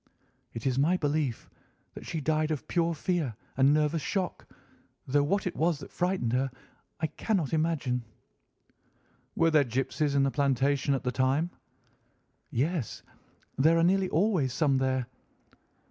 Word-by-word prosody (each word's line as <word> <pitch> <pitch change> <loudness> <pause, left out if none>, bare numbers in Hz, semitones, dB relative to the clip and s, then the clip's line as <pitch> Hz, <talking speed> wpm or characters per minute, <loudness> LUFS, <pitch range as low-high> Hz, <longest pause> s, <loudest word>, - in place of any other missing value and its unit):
"It 115 - -6
is 130 -1 +1
my 170 +6 +3
belief 145 -6 -1 0.5
that - - -10
she 160 - -3
died 155 +1 +1
of 155 -4 -3
pure 170 -1 +1
fear 155 - -1 0.2
and 135 +1 +5
nervous 155 +1 +2
shock, 190 +5 -3 0.6
though 145 +2 +2
what 195 +7 0
it 180 - -2
was 165 0 +1
that - - -11
frightened 180 -10 0
her 135 +2 +1 0.5
I 160 - 0
cannot 165 - -1
imagine." 155 -6 0 1.3
"Were 165 0 +3
there 155 -2 +5
gipsies 135 +4 -1
in 140 - +4
the 135 - +2
plantation 140 0 +1
at 135 - -4
the 125 - 0
time?" 135 +7 +1 1.0
"Yes, 145 - -2 0.6
there 160 +4 +5
are 165 - +3
nearly 190 +1 +3
always 165 - +1
some 140 -4 +2
there." 130 -1 0
150 Hz, 145 wpm, -29 LUFS, 135-165 Hz, 1.3 s, and